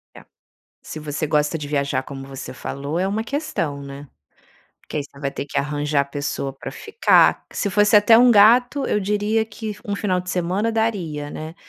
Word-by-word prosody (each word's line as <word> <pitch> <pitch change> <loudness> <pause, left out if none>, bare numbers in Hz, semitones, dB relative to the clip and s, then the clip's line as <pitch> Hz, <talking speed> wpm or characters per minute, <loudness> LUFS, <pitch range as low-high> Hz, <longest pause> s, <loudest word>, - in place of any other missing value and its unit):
É. - - -13 0.6
Se 155 - -8
você 150 +1 -3
gosta 150 +1 +1
de 145 - -6
viajar, 140 -2 -1
como 135 -1 -8
você 135 -1 -8
falou, 140 +5 -4
é 190 - +1
uma 215 +3 -1
questão, 195 - -3
né? 140 +1 -9 0.7
Porque - - -6
aí 145 - -2
você 140 -1 -16
vai 140 -1 -2
ter 140 - -5
que - - -5
arranjar 145 0 0
pessoa 145 -1 -3
pra 135 0 -8
ficar 430 - +3
Se 200 - -2
fosse 205 +2 +4
até 215 +2 +7
um 245 +1 +6
gato, 245 +6 +5
eu 210 - +1
diria 210 +2 0
que 215 0 -6
um 205 -1 -2
final 185 -3 0
de 180 - -7
semana 185 +5 0
daria, 180 -10 -2
né? 155 +2 -7
165 Hz, 190 wpm, -21 LUFS, 145-210 Hz, 0.7 s, até